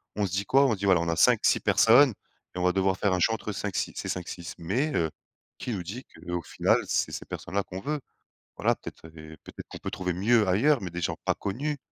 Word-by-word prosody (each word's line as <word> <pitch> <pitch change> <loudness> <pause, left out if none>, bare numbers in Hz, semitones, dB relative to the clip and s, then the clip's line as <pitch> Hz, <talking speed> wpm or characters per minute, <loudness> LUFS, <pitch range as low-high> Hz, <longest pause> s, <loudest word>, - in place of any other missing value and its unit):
on 105 -2 0
se - - -9
dit 100 +2 -1
quoi? 135 +5 +4
On 120 - +2
se - - -3
dit: 100 - -3
«Voilà, 90 -3 +4
on 85 - -1
a 85 - +1
5-6 - - +4
personnes 120 +2 +5 0.4
et 90 - -5
on 90 - -1
va 90 0 +3
devoir 95 -1 +2
faire 100 - +1
un 90 - +1
choix 110 - +3
entre 105 - -5
5-6 100 -1 -3
ces - - -5
5-6». 85 -1 -5
Mais, 125 - -1
heu, 80 -1 +1 0.5
qui 125 - -5
nous 95 - -3
dit 115 +9 -7
qu'au 90 0 -6
final, - - +2
c'est - - 0
ces - - -6
personnes-là 100 +1 -3
qu'on 95 0 -7
veut? 150 +4 -2 0.6
Voilà, - - +2
peut-être 80 - -11
les 80 0 -11
peut-être - - -11
qu'on - - -9
peut - - -5
trouver 90 -1 -2
mieux 105 +5 +3
ailleurs, 120 +10 +3
mais 90 - -4
des 85 - -5
gens 85 - -1
pas - - +2
connus. 140 +9 -3
95 Hz, 245 wpm, -27 LUFS, 90-115 Hz, 0.6 s, personnes